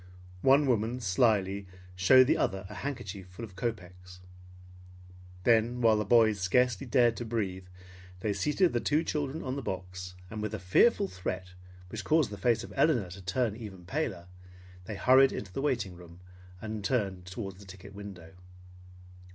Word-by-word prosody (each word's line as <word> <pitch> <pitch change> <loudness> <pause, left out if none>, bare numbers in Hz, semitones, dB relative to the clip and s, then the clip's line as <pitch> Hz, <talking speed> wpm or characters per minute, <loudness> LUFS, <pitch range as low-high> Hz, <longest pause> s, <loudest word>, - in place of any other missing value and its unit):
One 135 +5 +5
woman 120 -1 0
slyly, 100 -2 +1 0.3
showed 95 +8 +7
the - - +3
other 95 -1 -1
a - - -10
handkerchief 105 -9 -6
full 90 +6 -8
of 100 -4 -16
kopeks. 90 -4 -6 1.2
Then 120 +2 +3
while 115 -2 +4
the 105 - -1
boys 110 -1 +4
scarcely 120 +5 +1
dared 120 -1 +3
to - - -4
breathe, 100 -5 -3 0.5
they 105 -2 0
seated 165 - +1
the 120 - +1
two 150 +6 +1
children 150 0 -3
on 130 +1 -3
the - - -3
box, 90 -3 -6 0.2
and 110 -1 -5
with 110 0 -3
a - - -5
fearful 195 - +3
threat 95 - -5 0.4
which - - -6
caused 155 -7 +2
the 105 - -6
face 115 +2 +2
of - - -10
Elinor 120 - +2
to 95 +2 -9
turn 105 +4 -1
even 100 -6 -9
paler, 95 - -3 0.6
they 105 - -5
hurried 130 +7 +5
into 95 -3 -6
the - - -3
waiting 120 -10 -1
room, 85 0 -14 0.4
and 110 -1 -5
turned 95 -6 -1
towards 95 0 -6
the 100 - -13
ticket 95 +1 -12
window. 95 -4 -10
105 Hz, 170 wpm, -30 LUFS, 95-125 Hz, 1.2 s, showed